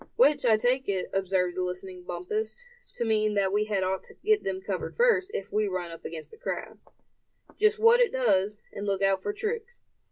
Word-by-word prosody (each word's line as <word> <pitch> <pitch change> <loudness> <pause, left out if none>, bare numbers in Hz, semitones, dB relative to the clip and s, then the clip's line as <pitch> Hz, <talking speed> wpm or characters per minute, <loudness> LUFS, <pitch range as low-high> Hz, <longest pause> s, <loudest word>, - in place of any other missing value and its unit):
"Which 300 - +4
I 220 -2 +6
take 250 +3 +1
it," 190 -2 -1
observed 185 -2 0
the 185 - -1
listening 180 0 -5
Bumpus, 215 - -3 0.3
"to 235 - -2
mean, 215 -1 +2
that 195 -1 +1
we 210 +1 +2
had 205 -3 0
ought 190 +1 -1
to - - -16
get 430 +1 +2
them 190 -1 -2
covered 190 -1 -4
first, 465 -6 +3
if 195 - -5
we 215 0 +2
run 180 -3 -3
up 165 - -11
against 160 -1 -7
the 445 - -13
crowd." - - -5 0.8
"Just 430 +1 +4
what 460 +2 +6
it 485 - +4
does, 210 -5 +2 0.2
and 205 +1 -5
look 195 -1 0
out 195 -1 +3
for 205 - -2
tricks. 450 - -4
205 Hz, 210 wpm, -28 LUFS, 190-285 Hz, 0.8 s, I